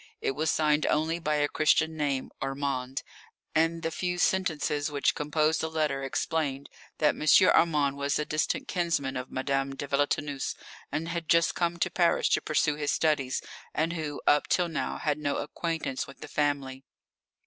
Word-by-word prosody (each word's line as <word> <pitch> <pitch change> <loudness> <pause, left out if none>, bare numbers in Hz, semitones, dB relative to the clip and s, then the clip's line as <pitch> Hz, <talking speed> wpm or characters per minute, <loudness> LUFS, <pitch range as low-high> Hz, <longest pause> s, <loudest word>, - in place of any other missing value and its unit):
It - - 0
was 155 +4 -1
signed 150 -1 +2
only 160 +2 +1
by 150 -2 0
a 145 0 +2
Christian 160 +1 +2
name, 140 -3 -1
"Armand," 135 -1 -2 0.5
and 165 +1 +1
the 165 - -1
few 180 +1 -2
sentences 160 -6 +1
which 145 -1 +1
composed 155 +1 +1
the 160 - -2
letter 155 -4 0
explained 140 0 -2 0.3
that 150 - +3
M. - - -7 0.3
Armand 145 -4 +3
was 140 0 0
a 150 - -1
distant 155 - -1
kinsman 165 -7 -1
of 125 0 -4
Madame 135 +1 -1
de 145 - -5
Villetaneuse 145 0 -1 0.4
who 160 - -2
had 165 -1 -4
just 165 0 +4
come 170 -1 -1
to - - 0
Paris 175 -2 +2
to - - +2
pursue 150 0 +1
his 145 -1 0
studies, 145 -5 +1 0.3
and 160 +2 0
who, 155 -3 -4
up 145 - +4
till 175 -2 +2
now, 165 - -2
had 150 -1 -1
no 145 -1 -1
acquaintance 160 -3 -3
with 135 - -14
the - - -7
family. 140 -3 -1
150 Hz, 170 wpm, -28 LUFS, 140-160 Hz, 0.5 s, just